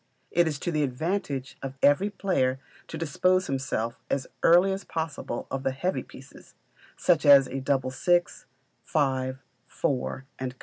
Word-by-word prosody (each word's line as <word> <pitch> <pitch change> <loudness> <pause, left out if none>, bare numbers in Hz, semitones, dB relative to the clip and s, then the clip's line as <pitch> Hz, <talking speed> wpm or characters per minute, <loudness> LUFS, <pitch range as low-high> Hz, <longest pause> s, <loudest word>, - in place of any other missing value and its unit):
It 175 0 +3
is 150 -3 -2
to 175 - -1
the 155 -2 0
advantage 140 0 -2
of 135 0 -6
every 145 +8 +4
player 135 -11 0 0.3
to - - -6
dispossess 185 +4 +1
himself 130 -4 -2
as 135 -2 -1 0.2
early 180 +3 +5
as 195 - -5
possible 160 -7 -4
of 135 - -2
the 135 -1 -1
heavy 180 +8 -1
pieces, - - -15 0.4
such 170 -4 +2
as 140 -2 +8
a 135 - -4
double 130 -1 0
six, 175 +4 0 0.4
five, 130 -1 -1 0.2
four, 130 -1 -2 0.2
&c. 130 -1 -3
140 Hz, 150 wpm, -27 LUFS, 130-175 Hz, 0.4 s, as